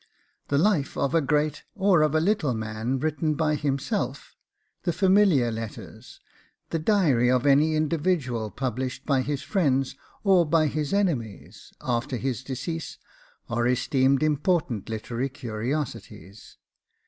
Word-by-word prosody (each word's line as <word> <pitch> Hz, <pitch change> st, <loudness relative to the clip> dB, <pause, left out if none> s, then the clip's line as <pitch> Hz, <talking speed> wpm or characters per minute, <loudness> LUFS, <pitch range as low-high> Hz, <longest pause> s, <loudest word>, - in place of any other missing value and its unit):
The 140 Hz, -, +1 dB
life 165 Hz, -4 st, +1 dB
of 140 Hz, -, 0 dB
a 165 Hz, -, +4 dB
great 150 Hz, +1 st, 0 dB
or 190 Hz, -5 st, +3 dB
of 155 Hz, 0 st, +2 dB
a -, -, +4 dB
little 160 Hz, -, +1 dB
man 110 Hz, +3 st, -2 dB
written 155 Hz, +2 st, -1 dB
by 155 Hz, 0 st, +1 dB
himself, 140 Hz, -2 st, -2 dB, 0.5 s
the 175 Hz, -, 0 dB
familiar 185 Hz, -, +3 dB
letters, 115 Hz, -1 st, -8 dB, 0.5 s
the 165 Hz, -, 0 dB
diary 155 Hz, -, +3 dB
of 130 Hz, +1 st, +2 dB
any 145 Hz, +3 st, +4 dB
individual 150 Hz, -7 st, 0 dB
published 130 Hz, +2 st, -4 dB
by 135 Hz, -3 st, +2 dB
his 140 Hz, +1 st, -3 dB
friends 135 Hz, -4 st, 0 dB, 0.3 s
or 190 Hz, -4 st, +5 dB
by 160 Hz, 0 st, +2 dB
his 150 Hz, 0 st, -2 dB
enemies, 150 Hz, -, -2 dB
after 125 Hz, +1 st, -1 dB
his 130 Hz, -2 st, -2 dB
decease, 140 Hz, +5 st, -5 dB, 0.5 s
are 120 Hz, 0 st, 0 dB
esteemed 130 Hz, +2 st, +2 dB
important 150 Hz, -, 0 dB
literary 115 Hz, +4 st, -3 dB
curiosities. 115 Hz, -4 st, -5 dB
140 Hz, 130 wpm, -26 LUFS, 125-155 Hz, 0.5 s, or